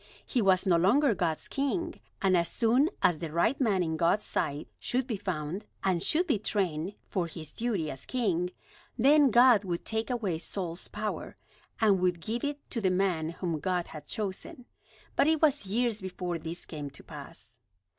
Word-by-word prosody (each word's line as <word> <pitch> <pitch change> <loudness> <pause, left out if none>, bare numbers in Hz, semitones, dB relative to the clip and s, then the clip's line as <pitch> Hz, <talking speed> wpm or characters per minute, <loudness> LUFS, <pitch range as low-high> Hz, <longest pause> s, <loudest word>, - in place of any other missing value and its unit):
He 250 - 0
was 190 -1 +4
no 180 -3 +4
longer 230 - +4
God's 170 -5 -1
king; 285 +5 -2 0.2
and 190 -1 +4
as 170 -1 +2
soon 250 +7 +3
as 170 -4 +4
the 160 -2 -5
right 195 - +1
man 200 -7 +3
in 160 -1 -2
God's 170 +6 +2
sight 145 +2 -2
should 255 +1 0
be 245 -4 -2
found, 185 0 -4 0.2
and 185 -3 +2
should 335 - +2
be 275 - +1
trained 190 -3 -1
for 180 -3 -1
his 160 -2 -8
duty 205 -10 -1
as 135 - -9
king, 185 -9 0 0.5
then 280 +3 +6
God 240 -2 +6
would 175 -3 -3
take 220 +1 -1
away 210 -10 -1
Saul's 175 -1 -3
power, 210 0 -4 0.4
and 205 -4 +4
would 180 -1 +1
give 225 +8 -3
it 290 0 -3
to 230 - -1
the 190 - +3
man 180 -4 +1
whom 170 -1 -3
God 180 +2 -1
had 150 -2 -9
chosen. 215 +3 -5 0.5
But - - +4
it 320 0 +3
was 290 -9 +3
years 225 +1 0
before 180 -2 -4
this 165 +2 -6
came 150 -3 -6
to 140 - -13
pass. - - -8
190 Hz, 185 wpm, -29 LUFS, 170-235 Hz, 0.5 s, then